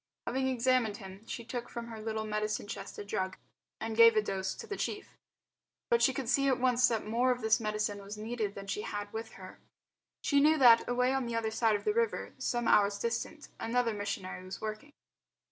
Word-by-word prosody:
Having 265 Hz, +1 st, 0 dB
examined 250 Hz, -4 st, +1 dB
him 190 Hz, +1 st, -11 dB
she 235 Hz, -, -6 dB
took 240 Hz, 0 st, -5 dB
from 235 Hz, -1 st, -6 dB
her 225 Hz, -1 st, -7 dB
little 220 Hz, 0 st, -3 dB
medicine 210 Hz, 0 st, -2 dB
chest 205 Hz, -, -7 dB
a 205 Hz, -, -6 dB
drug 190 Hz, -2 st, -2 dB, 0.4 s
and 225 Hz, 0 st, -3 dB
gave 230 Hz, 0 st, +8 dB
a 215 Hz, -, +4 dB
dose 190 Hz, -2 st, -2 dB
to -, -, -8 dB
the 405 Hz, -, -4 dB
chief. 410 Hz, -, -4 dB, 0.8 s
But 470 Hz, -, +4 dB
she 265 Hz, -, +5 dB
could 260 Hz, -1 st, -4 dB
see 275 Hz, +3 st, +3 dB
at 260 Hz, -2 st, +2 dB
once 250 Hz, 0 st, +4 dB
that 225 Hz, -3 st, -1 dB
more 235 Hz, +4 st, +1 dB
of 250 Hz, 0 st, 0 dB
this 220 Hz, 0 st, +3 dB
medicine 210 Hz, -2 st, -2 dB
was 200 Hz, +1 st, -8 dB
needed 215 Hz, -2 st, -3 dB
than 195 Hz, -, -7 dB
she 200 Hz, +1 st, -3 dB
had 205 Hz, -1 st, -5 dB
with 225 Hz, 0 st, -5 dB
her. 185 Hz, -1 st, -11 dB, 0.6 s
She 285 Hz, -, +3 dB
knew 310 Hz, +2 st, +5 dB
that, 240 Hz, -5 st, +6 dB
away 250 Hz, +1 st, +2 dB
on 265 Hz, -2 st, -1 dB
the 235 Hz, -, -3 dB
other 225 Hz, -1 st, -1 dB
side 220 Hz, -1 st, +2 dB
of 205 Hz, -, -3 dB
the 425 Hz, -, +2 dB
river, 465 Hz, 0 st, -1 dB
some 240 Hz, -1 st, -1 dB
hours 205 Hz, -1 st, +4 dB
distant, 235 Hz, +7 st, -3 dB
another 235 Hz, 0 st, 0 dB
missionary 200 Hz, -3 st, -4 dB
was 185 Hz, +1 st, -7 dB
working. 215 Hz, +6 st, -6 dB
225 Hz, 215 wpm, -31 LUFS, 210-250 Hz, 0.8 s, gave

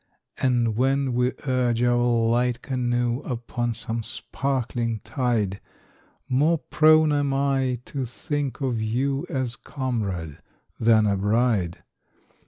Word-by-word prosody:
And 120 Hz, -4 st, +1 dB
when 135 Hz, +2 st, +1 dB
we 125 Hz, +1 st, +2 dB
urge 125 Hz, -3 st, +1 dB
our 120 Hz, 0 st, +3 dB
light 120 Hz, 0 st, +1 dB
canoe 120 Hz, -2 st, 0 dB
Upon 120 Hz, -2 st, -3 dB
some 115 Hz, +1 st, -3 dB
sparkling 120 Hz, -1 st, -2 dB
tide, 110 Hz, -5 st, -1 dB, 0.7 s
More 150 Hz, +6 st, +3 dB
prone 155 Hz, 0 st, +4 dB
am 140 Hz, -2 st, +1 dB
I 135 Hz, -3 st, 0 dB
to 135 Hz, -3 st, -3 dB
think 145 Hz, +2 st, -4 dB
of 125 Hz, -5 st, -1 dB
you 135 Hz, +6 st, -1 dB
As 130 Hz, -3 st, -2 dB
comrade 105 Hz, -, -4 dB, 0.4 s
than 110 Hz, -1 st, +4 dB
as 100 Hz, -2 st, +1 dB
bride. 105 Hz, -4 st, +1 dB
120 Hz, 115 wpm, -24 LUFS, 115-135 Hz, 0.7 s, prone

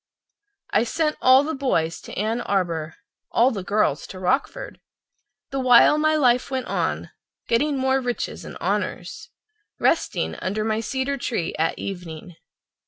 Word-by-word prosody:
I -, -, +3 dB
sent 305 Hz, +5 st, 0 dB
all 260 Hz, +2 st, +7 dB
the 315 Hz, +2 st, -3 dB
boys 170 Hz, -, -1 dB
to -, -, -10 dB
Ann 220 Hz, +4 st, 0 dB
Arbor, 170 Hz, -7 st, -1 dB, 0.3 s
all 240 Hz, +3 st, +4 dB
of -, -, -4 dB
the 200 Hz, -, -4 dB
girls 200 Hz, -7 st, 0 dB
to 190 Hz, -, -9 dB
Rockford, 265 Hz, -, -1 dB, 0.7 s
The 270 Hz, -, -2 dB
while 255 Hz, +3 st, +6 dB
my 310 Hz, 0 st, +3 dB
life 250 Hz, -4 st, +3 dB
went 260 Hz, -2 st, -2 dB
on, -, -, -2 dB, 0.4 s
getting 280 Hz, +5 st, +1 dB
more 265 Hz, 0 st, +1 dB
riches 245 Hz, -1 st, -3 dB
and -, -, -9 dB
honors— 200 Hz, -, -3 dB, 0.5 s
Resting -, -, 0 dB
under 205 Hz, +3 st, -2 dB
my 220 Hz, 0 st, 0 dB
cedar 265 Hz, +4 st, -2 dB
tree 225 Hz, -9 st, -2 dB
at 165 Hz, +1 st, +1 dB
evening. 175 Hz, -3 st, -7 dB
235 Hz, 150 wpm, -23 LUFS, 185-270 Hz, 0.7 s, all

